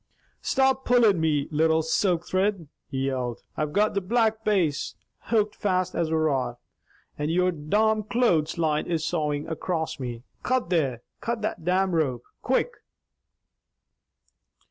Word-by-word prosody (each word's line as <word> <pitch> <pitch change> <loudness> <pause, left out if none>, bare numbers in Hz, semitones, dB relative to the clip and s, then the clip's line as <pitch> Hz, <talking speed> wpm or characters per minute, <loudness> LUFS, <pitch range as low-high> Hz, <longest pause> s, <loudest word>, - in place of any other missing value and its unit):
"Stop 265 0 +2
pullin' 230 -9 +4
me 150 -3 +1
little 160 +1 +3
silk 170 +1 +1
thrid!" 190 -3 0 0.2
he 135 -1 -2
yelled. 125 -3 -2
"I've 150 -1 -2
got 210 +6 +2
the 200 - 0
Black 220 +2 +1
Bass 175 -9 +1 0.3
hooked 215 -2 +1
fast 185 -3 0
as 165 -2 0
a 160 - +1
rock, 135 -6 0 0.6
and 150 +1 -1
your 180 +2 +2
domn 210 +8 +1
clothes 180 -11 +2
line 155 -2 +1
is 165 -2 -1
sawin' 150 -3 -1
across 160 -1 -3
me. 120 -2 -5 0.2
Cut 255 -8 0
there! 135 -9 +1 0.2
Cut 235 -2 -3
that 185 -6 -3
domn 185 +1 +2
rope! 135 -8 0 0.2
Quick!" 265 - +1
170 Hz, 140 wpm, -26 LUFS, 150-210 Hz, 0.6 s, pullin